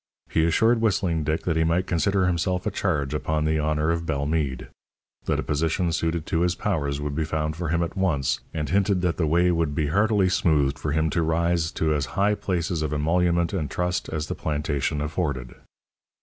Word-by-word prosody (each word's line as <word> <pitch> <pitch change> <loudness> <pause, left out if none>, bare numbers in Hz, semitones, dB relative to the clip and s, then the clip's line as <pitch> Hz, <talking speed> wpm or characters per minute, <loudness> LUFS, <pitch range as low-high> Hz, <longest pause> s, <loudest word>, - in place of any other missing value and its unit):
He 80 - +3
assured 110 +8 +3
Whistling 90 -7 +1
Dick 75 +2 -1
that 85 - 0
he 80 - +2
might 85 +3 +1
consider 95 +3 +1
himself 90 +2 0
a 105 - 0
charge 75 -8 -1
upon 75 +1 -1
the 80 0 +1
honour 75 +1 +1
of 85 0 -1
Bellemeade; 70 -2 -1 0.6
that - - 0
a - - -1
position 80 +4 0
suited 80 0 -1
to 80 - 0
his 90 0 +1
powers 70 -10 -1
would 75 -1 -3
be 80 +2 -1
found 75 0 -2
for 85 -1 -3
him 85 +1 +1
at 85 - -5
once, 75 -9 0
and 75 -2 -3
hinted 95 +3 +2
that 90 -2 0
the 80 - +1
way 85 +3 +3
would 80 -4 0
be 75 -1 0
heartily 100 +2 +3
smoothed 75 -6 +2
for 75 - -2
him 80 +1 +1
to 85 - +1
rise 85 0 +1
to 80 -1 +1
as 70 -3 -1
high 100 +2 +3
places 85 -5 -2
of 75 -2 -2
emolument 85 +3 +1
and 80 -7 -2
trust 90 +3 -2
as 75 -1 -2
the - - -4
plantation 75 -1 -2
afforded. 75 -5 -3
80 Hz, 205 wpm, -25 LUFS, 75-90 Hz, 0.6 s, He